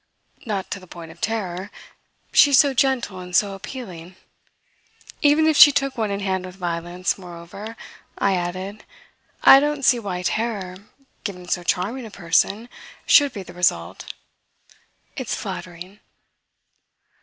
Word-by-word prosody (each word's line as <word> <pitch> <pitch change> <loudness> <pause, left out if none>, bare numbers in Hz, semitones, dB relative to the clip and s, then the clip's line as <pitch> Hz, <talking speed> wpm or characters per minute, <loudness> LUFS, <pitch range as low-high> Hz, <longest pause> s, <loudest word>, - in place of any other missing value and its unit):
"Not 200 -3 -3
to 200 - -3
the 185 - -16
point 165 -1 -10
of 170 - -18
terror. 195 -4 -3 0.6
She's 285 -2 +6
so 280 0 +5
gentle 255 -7 0
and 180 -1 -7
so 200 +1 +3
appealing. 190 -5 -9 1.1
Even 295 +2 +4
if 315 -1 +3
she 295 0 +10
took 275 -1 -1
one 220 -3 -1
in 200 0 -3
hand 190 -2 -1
with 180 - -11
violence, 175 +1 -3
moreover," 180 +5 -9 0.4
I 195 -1 +2
added, 185 +4 -4 0.6
"I 270 - +10
don't 295 -1 -1
see 245 - +5
why 185 -5 -4
terror 200 -3 -2 0.5
given 180 -3 -6
so 175 - -1
charming 210 +8 -2
a - - -11
person 200 +5 0 0.4
should 285 -3 +6
be 205 -5 -7
the 175 - -12
result. 95 - -1 1.0
It's - - -3
flattering." 180 +3 -8
195 Hz, 140 wpm, -22 LUFS, 180-230 Hz, 1.1 s, she